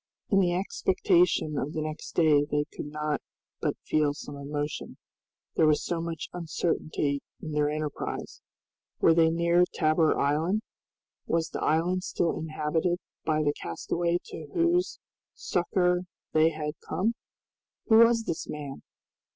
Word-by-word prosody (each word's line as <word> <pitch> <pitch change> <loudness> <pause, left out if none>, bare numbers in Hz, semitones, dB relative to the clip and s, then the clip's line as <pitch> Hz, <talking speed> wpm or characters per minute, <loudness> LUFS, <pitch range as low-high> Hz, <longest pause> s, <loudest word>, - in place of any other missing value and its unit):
In 195 - +5
the 175 -2 +2
expectation 180 -4 +2
of 150 +4 -3
the 155 - -2
next 155 0 -6
day 150 -3 +5
they 145 0 0
could - - -5
not 150 0 -2 0.4
but - - -1
feel 150 -2 +2
some 145 0 -8
emotion. 145 +1 -4 0.6
There 160 - +4
was 150 -1 +2
so 170 -1 -1
much 165 -2 -4
uncertainty 160 -4 -1 0.2
in 155 - -6
their 150 0 +2
enterprise! 150 -1 -4 0.6
Were 165 - +6
they 165 0 +5
near 170 +1 +3
Tabor 155 0 +3
Island? 160 +9 +1 0.6
Was 165 0 +1
the - - -5
island 175 +4 +1
still 170 -2 0
inhabited 160 +2 0 0.3
by 155 -1 +2
the 145 -1 +2
castaway 170 - -1
to 155 - -8
whose 345 +1 +2 0.4
succor 180 0 +1 0.3
they 155 +1 +5
had 155 -1 -3 0.2
come? 220 +5 +1 0.8
Who 220 - +7
was 230 0 +6
this 165 - -4
man? 145 -2 -6
160 Hz, 140 wpm, -28 LUFS, 150-175 Hz, 0.8 s, Who